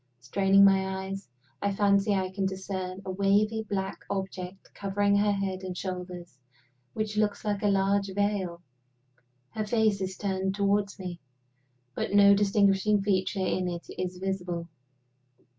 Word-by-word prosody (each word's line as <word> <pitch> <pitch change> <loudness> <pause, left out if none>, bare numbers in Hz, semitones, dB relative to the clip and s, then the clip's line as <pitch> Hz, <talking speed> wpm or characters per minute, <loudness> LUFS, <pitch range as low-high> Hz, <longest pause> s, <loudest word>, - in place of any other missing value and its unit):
Straining 195 +10 +4
my 190 -1 +2
eyes, 195 -3 -6 0.3
I 200 - +1
fancy 200 0 +3
I 185 -1 -1
can 195 0 -1
discern 190 0 -5
a 190 - -3
wavy 200 +3 +2
black 195 -1 -3
object 190 -1 -5
covering 200 0 +1
her 205 0 +3
head 195 -2 -2
and 185 -1 -5
shoulders 180 -6 -6 0.5
which 215 -1 -3
looks 215 0 0
like 205 -1 -1
a 210 - +2
large 195 0 +2
veil. 195 -4 -1 0.9
Her 215 - -2
face 215 -3 +2
is 190 0 -3
turned 190 -1 -1
toward 200 0 +2
me, 180 -3 -6 0.7
but - - -3
no 200 0 +7
distinguishing 200 0 +3
feature 190 -1 0
in 185 -1 0
it 175 -1 -4
is 180 0 -4
visible. 180 -3 -3
195 Hz, 140 wpm, -28 LUFS, 185-200 Hz, 0.9 s, no